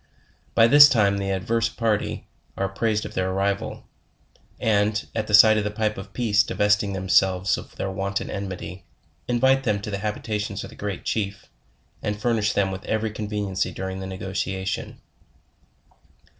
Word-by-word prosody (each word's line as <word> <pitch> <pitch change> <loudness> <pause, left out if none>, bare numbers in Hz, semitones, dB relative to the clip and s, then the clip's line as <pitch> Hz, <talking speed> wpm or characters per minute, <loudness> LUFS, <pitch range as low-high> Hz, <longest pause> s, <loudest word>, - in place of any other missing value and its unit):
By 115 - +7
this 145 +4 +9
time 100 -5 +2
the 100 0 -2
adverse 110 +4 0
party 115 -3 -1 0.3
are 95 - 0
apprised 105 +2 -1
of - - -7
their 95 0 -1
arrival, 100 +1 -2 0.7
and, 105 0 +1
at 110 -1 -2
the 105 - +5
sight 110 +1 +7
of - - -1
the 105 - -1
pipe 110 0 -1
of 95 0 -9
peace 105 -2 +2
divesting 105 0 +1
themselves 95 0 +2
of - - -10
their 95 - -3
wonted 100 0 -3
enmity, 95 -1 -6 0.4
invite 130 +2 +3
them 105 -4 +1
to 105 - -5
the 100 - -3
habitations 105 -1 -3
of - - -9
the - - -13
Great 100 -2 -5
Chief, 100 -2 -2 0.6
and 105 0 -3
fur 120 +2 +1
nish 110 -2 +1
them 100 -1 +1
with 95 +1 -6
every 110 0 -1
conveniency 105 -3 -2
during 95 0 -5
the 95 - -5
negotiation. 95 0 -4
100 Hz, 165 wpm, -24 LUFS, 95-110 Hz, 0.7 s, this